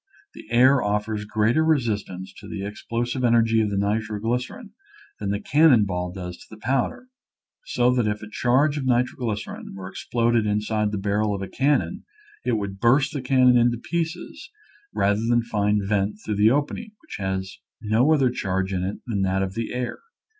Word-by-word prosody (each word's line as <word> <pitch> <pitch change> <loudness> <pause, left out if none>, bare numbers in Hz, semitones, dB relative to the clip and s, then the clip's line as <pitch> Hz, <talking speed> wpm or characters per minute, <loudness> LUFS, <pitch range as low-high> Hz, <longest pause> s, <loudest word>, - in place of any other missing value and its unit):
The - - -12
air 130 +3 +5
offers 105 +1 -1
greater 110 +7 +2
resistance 105 - -1
to - - -11
the 100 -2 -5
ex 105 0 -7
plosive 120 +2 -1
energy 115 -1 +4
of 105 - 0
nitroglycerin 110 - -2 0.5
than 100 - -3
the 100 0 -1
can 155 +7 +4
non 115 -7 +5
ball 90 -2 -3
does 90 -1 -7
to 110 - -12
powder, 130 - -1 0.6
so 120 +1 +2
that 120 -3 +1
if 105 0 -2
a - - -7
charge 135 +7 +2
of 135 - -4
nitroglycerin 120 -5 -2
were 95 -1 -7
exploded 115 +2 0
inside 105 +1 0
of 105 - 0
the 105 - -2
barrel 105 +1 0
of 100 - -5
a - - -4
cannon 145 - 0 0.4
it - - 0
would 100 -3 -3
burst 135 +6 +3
the 140 - -3
can 130 -1 +4
non - - +5
in 120 -1 +2
pieces 170 +4 -4 0.4
rather 100 +2 +1
than 120 -1 +3
find 105 -2 0
vent 100 0 0
through 105 -2 -2
the 105 +2 +5
opening, 145 - -1
which 315 - -8
has 95 -1 -3 0.2
no 115 +6 +2
other 135 -5 +3
charge 95 -4 -2
in 90 -1 -1
it 95 +2 -3
than 105 -5 -2
that 95 0 +1
of 95 -1 -4
the 115 +1 -4
air. 125 0 -3
110 Hz, 185 wpm, -24 LUFS, 100-125 Hz, 0.6 s, air